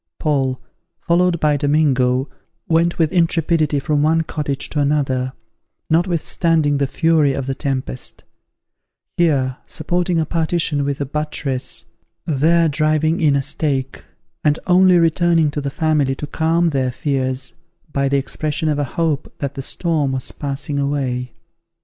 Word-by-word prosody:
Paul, 135 -4 0 0.4
followed 175 0 +2
by 150 -2 +2
Domingo, 135 -3 +2 0.4
went 170 0 +2
with 160 -3 +2
intrepidity 165 -3 +1
from 145 +1 0
one 160 +2 +3
cottage 145 -3 -3
to 150 - -2
another, 135 -3 0 0.6
notwithstanding 165 -3 +1
the 140 - +1
fury 155 -1 +2
of 135 -1 -3
the 135 - -2
tempest; 130 -1 -4 0.9
here 135 -7 +2
supporting 175 -1 -1
a 160 - +1
partition 165 -2 0
with 140 0 -2
a - - 0
buttress, 145 -2 -2 0.4
there 165 +3 +3
driving 155 +2 +1
in 150 -3 +4
a 140 - +1
stake; 135 -2 -2 0.4
and 150 0 +3
only 185 0 +5
returning 165 -1 +3
to 145 - -3
the 140 - -2
family 150 -3 +1
to 150 - -5
calm 165 +3 +1
their 130 -4 0
fears, 130 -1 -1 0.4
by 140 0 +1
the 140 - +2
expression 155 +3 -2
of 150 -1 0
a - - +1
hope 160 -3 0
that 140 -1 -4
the 135 - -5
storm 150 -1 -1
was 130 -2 -3
passing 140 0 -3
away. 130 -3 -2
150 Hz, 145 wpm, -19 LUFS, 135-165 Hz, 0.9 s, only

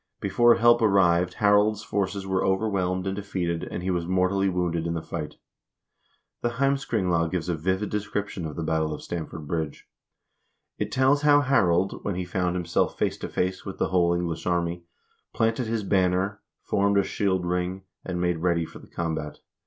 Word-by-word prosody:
Before 120 0 +4
help 120 0 +5
arrived, 90 -4 +3
Harald's 105 0 +3
forces 100 -1 -2
were 95 -1 0
overwhelmed 95 -2 0
and 95 0 -1
defeated, 90 -4 -2
and 90 - -5
he 95 - 0
was 85 -2 -1
mortally 95 +1 +2
wounded 85 -2 -1
in 85 - -2
the 80 - -2
fight. 75 -3 -5 1.1
The 120 0 -1
"Heimskringla" 115 -11 +1
gives 90 -1 -3
a - - +1
vivid 95 +6 -1
description 105 -4 -3
of 75 - -7
the 85 - -3
battle 80 -1 0
of - - -11
Stamford 80 -2 -5
Bridge. 80 -3 -3 0.9
It - - -2
tells 135 +2 +3
how 145 -1 +5
Harald, 95 -9 +2
when 100 - -2
he 90 0 -3
found 90 0 -1
himself 85 -1 0
face - - 0
to - - -5
face 90 +1 -1
with 95 - -7
the - - 0
whole 85 -2 +3
English 85 -1 -3
army, 85 -1 -1 0.5
planted 115 +1 +1
his 110 -1 -1
banner, 95 +1 +1 0.2
formed 100 0 +2
a 100 - +4
shield 95 -2 0
ring, 90 +2 -2 0.2
and 90 -2 -4
made 90 -1 0
ready 85 -1 +1
for - - -12
the - - -15
combat. 80 -3 -3
90 Hz, 175 wpm, -26 LUFS, 85-100 Hz, 1.1 s, help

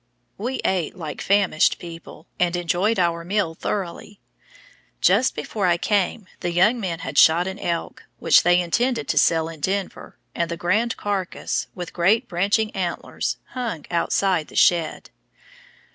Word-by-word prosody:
We 250 +5 -3
ate 180 -2 -1
like 155 -5 -6
famished 195 -5 +2
people, 165 -2 -11
and 175 0 +2
enjoyed 175 +5 0
our 170 -2 +1
meal 185 -2 -1
thoroughly. 195 +3 -5 0.8
Just 205 +8 +3
before 190 +6 -2
I 175 -1 +3
came 205 +2 0
the 175 - -2
young 210 +8 +3
men 170 -6 -3
had - - 0
shot 165 +3 +6
an 190 +2 -5
elk, 170 -3 -4
which - - +5
they 175 +1 +4
intended 235 +8 0
to - - 0
sell 160 -1 +3
in 165 -1 -9
Denver, 195 +5 -3 0.2
and 170 -1 -1
the 170 - -4
grand 215 +8 0
carcass, 200 -3 -2
with 175 -2 -7
great 215 +8 +2
branching 205 +4 +1
antlers, 180 -3 -3
hung 230 - -4
outside 175 -1 +1
the - - -14
shed. 170 -3 +2
180 Hz, 150 wpm, -23 LUFS, 170-205 Hz, 0.8 s, shot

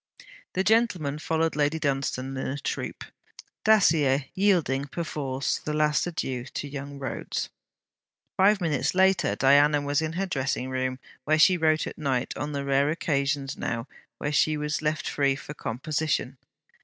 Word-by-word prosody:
The 190 - +1
gentlemen 185 -9 +2
followed 160 0 0
Lady 145 +1 +1
Dunstane 135 -2 -2
in 130 - -3
a 140 - -3
troop, 145 - -4 0.6
Dacier 155 -11 +4
yielding 170 -9 +2
perforce 140 -4 -3
the 150 - -4
last 150 +2 +2
adieu 130 -7 -3
to 145 - -5
young 140 0 -7
Rhodes. 135 -1 -4 0.9
Five 200 +1 +4
minutes 160 -1 0
later 190 0 +3
Diana 145 +2 +5
was 145 +1 0
in 160 0 -2
her 190 +3 -1
dressing 130 -5 -2
room, 130 0 -1 0.3
where 155 +1 +3
she 180 +4 +6
wrote 155 -2 +2
at - - -8
night, 130 -4 -1
on 145 +1 -4
the 140 -1 -3
rare 140 +1 +2
occasions 140 -3 -1
now 115 +2 -3 0.3
when 145 - -2
she 155 +1 +2
was 150 +1 -2
left 155 -1 -1
free 140 -2 +1
for 150 - -8
composition. 135 0 -2
145 Hz, 155 wpm, -26 LUFS, 135-160 Hz, 0.9 s, she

